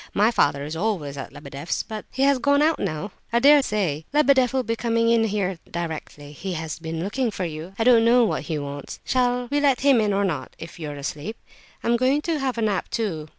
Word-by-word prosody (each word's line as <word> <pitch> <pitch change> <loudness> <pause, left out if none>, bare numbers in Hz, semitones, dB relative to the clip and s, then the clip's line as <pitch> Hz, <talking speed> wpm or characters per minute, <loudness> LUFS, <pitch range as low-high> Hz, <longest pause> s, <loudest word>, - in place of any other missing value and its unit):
My 210 +3 +4
father 145 -10 +2
is 150 +2 -5
always 165 -7 -2
at 140 - -7
Lebedeff's; 140 +2 -4
but 215 -2 -7
he 265 - -1
has 280 -1 +4
gone 285 +3 +3
out 320 +1 +3
just - - 0
now. 165 +5 -5 0.2
I 235 - +2
dare 285 +4 +7
say 185 - -1
Lebedeff 280 -4 +4
will 265 -1 0
be 230 -1 -1
coming 230 0 +1
in 230 -1 +4
here 195 -4 -1
directly; 160 -3 -6
he 180 +6 -5
has 160 -1 -5
been 165 0 -4
looking 235 +5 -1
for 195 -3 -3
you; 165 +3 -7
I 225 - +1
don't 235 -1 +6
know 240 +1 +5
what - - -1
he 160 - -1
wants. 145 -1 -6
Shall 245 -1 +1
we 290 - +2
let 280 -3 +2
him 270 -4 +5
in 210 -1 +1
or 200 0 +1
not, 170 -6 -3
if 165 +1 -10
you 155 -2 -5
are 145 - -6
asleep? 150 +8 -5 0.5
I'm 235 0 +2
going 265 +4 +2
to 325 -3 -1
have 265 -3 -2
a 230 - 0
nap, 205 -4 -1
too. 165 -10 -3
210 Hz, 240 wpm, -24 LUFS, 160-250 Hz, 0.5 s, dare